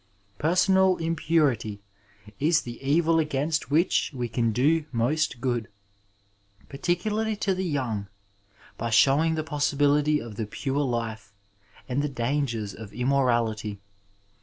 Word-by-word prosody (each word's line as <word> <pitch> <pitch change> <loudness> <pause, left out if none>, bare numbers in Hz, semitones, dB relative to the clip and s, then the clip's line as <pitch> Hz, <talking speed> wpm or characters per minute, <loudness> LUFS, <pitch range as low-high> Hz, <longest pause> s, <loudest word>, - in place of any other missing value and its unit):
Personal 185 +3 +3
impurity 155 -10 0 0.6
is 155 +2 +3
the 120 -1 -8
evil 165 +4 +2
against 150 +1 -1
which 165 +4 +2
we 125 -2 -2
can 115 -1 0
do 150 +7 +2
most 130 +3 0
good, 120 -3 -1 1.0
particularly 210 +9 -1
to 200 -1 0
the 185 +1 -2
young, 125 - -2 0.7
by 115 - -2
showing 145 +8 +4
the 155 - -2
possibility 145 0 +2
of 115 -5 -9
the 110 - -3
pure 135 +6 -2
life 115 -6 -3 0.6
and 130 +2 0
the 150 - -1
dangers 120 -5 -2
of 105 0 -10
immorality. 120 -5 0
140 Hz, 120 wpm, -26 LUFS, 115-160 Hz, 1.0 s, showing